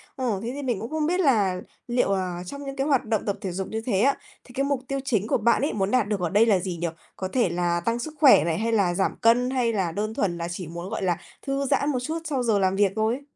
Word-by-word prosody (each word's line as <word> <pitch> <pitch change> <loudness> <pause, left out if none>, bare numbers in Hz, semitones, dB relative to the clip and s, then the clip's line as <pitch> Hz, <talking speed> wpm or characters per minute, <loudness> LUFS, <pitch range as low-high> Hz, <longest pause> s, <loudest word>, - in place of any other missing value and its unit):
Ồ, 240 -7 -1
thế 240 - -3
thì 285 - -5
mình 245 -7 -1
cũng 225 - -5
không 310 -1 -1
biết 355 +4 +1
là 205 - +2 0.3
liệu 240 -4 +1
là 180 -2 -3
trong 280 +9 -7
những 275 -1 -6
cái 275 +2 -1
hoạt 275 -5 +2
động 220 -2 -1
tập 200 -1 -1
thể 190 -4 -3
dục 190 +2 -4
như 220 0 -4
thế 200 -5 +1
á, 275 +2 +3 0.3
thì 245 - -16
cái 275 - 0
mục 280 -2 0
tiêu 275 0 -2
chính 220 -7 0
của - - +2
bạn 235 +3 +2
ấy 285 - 0
muốn 195 -1 -1
đạt 250 -5 +2
được 210 -1 -1
ở 175 -2 -1
đây 210 +4 +4
là 200 -5 +3
gì 180 -1 -4
nhỉ? 170 +1 -1 0.3
Có 185 - -3
thể 245 -7 +2
là 175 0 0
tăng 230 +1 0
sức 305 +5 -5
khỏe 280 - +7
này, 165 -1 0
hay 230 +1 0
là 195 -6 +2
giảm 190 +2 0
cân, 240 +2 +4
hay 245 -3 +1
là 185 -5 0
đơn 215 +5 -3
thuần 180 -6 -1
là 170 - -3
chỉ 175 -2 -5
muốn, 170 +3 -7
gọi - - -4
là, 175 -2 +1 0.3
thư 275 0 0
giãn 280 +1 +1
một 265 -4 0
chút 315 +5 -2
sau 270 -6 -1
giờ 220 -4 +2
làm 190 0 +2
việc 200 -1 +3
thôi? 225 +5 0
220 Hz, 295 wpm, -25 LUFS, 190-260 Hz, 0.3 s, khỏe